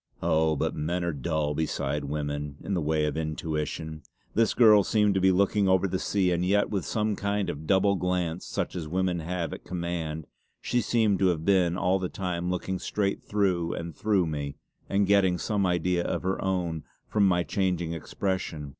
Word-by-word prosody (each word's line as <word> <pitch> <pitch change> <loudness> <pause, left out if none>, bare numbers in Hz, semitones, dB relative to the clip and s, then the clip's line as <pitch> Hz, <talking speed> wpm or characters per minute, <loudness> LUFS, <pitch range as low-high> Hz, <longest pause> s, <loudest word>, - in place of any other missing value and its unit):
Oh, 80 0 +2
but - - -1
men 85 +4 -1
are 85 -1 -1
dull 75 +1 -1
beside 75 -2 -2
women 75 0 -3
in 100 - -3
the 90 - 0
way 75 0 +1
of 75 - -2
intuition. 80 0 -3 0.3
This 115 +1 +2
girl 110 -4 +7
seemed 105 -1 +2
to 95 - +1
be 95 0 +5
looking 100 +2 +2
over 95 +1 +3
the 95 0 -2
sea, 95 -3 +1
and 85 0 +1
yet 100 +3 +2
with 100 -5 -1
some 105 -1 0
kind 100 0 -1
of 75 +2 -9
double 100 +1 +4
glance, 90 -2 -1
such - - -3
as 85 -4 -4
women 90 +1 0
have 85 +1 -3
at - - -8
command, 85 -3 -4 0.3
she 120 0 0
seemed 110 -5 +2
to 95 - +4
have 80 -3 0
been 90 -3 +3
all 95 0 +2
the 90 -1 -2
time 90 -2 -3
looking 90 +1 -2
straight 100 -2 -1
through 90 -5 0
and 85 -2 -6
through 100 -2 +2
me 70 -3 -4 0.3
and 100 0 +2
getting 95 -2 +3
some 100 +1 0
idea 90 0 +1
of - - -2
her 95 +1 -1
own 90 -4 -1 0.2
from 105 -2 +3
my 90 -1 +2
changing 90 -3 -1
expression. 85 -3 -3
90 Hz, 190 wpm, -27 LUFS, 80-95 Hz, 0.3 s, girl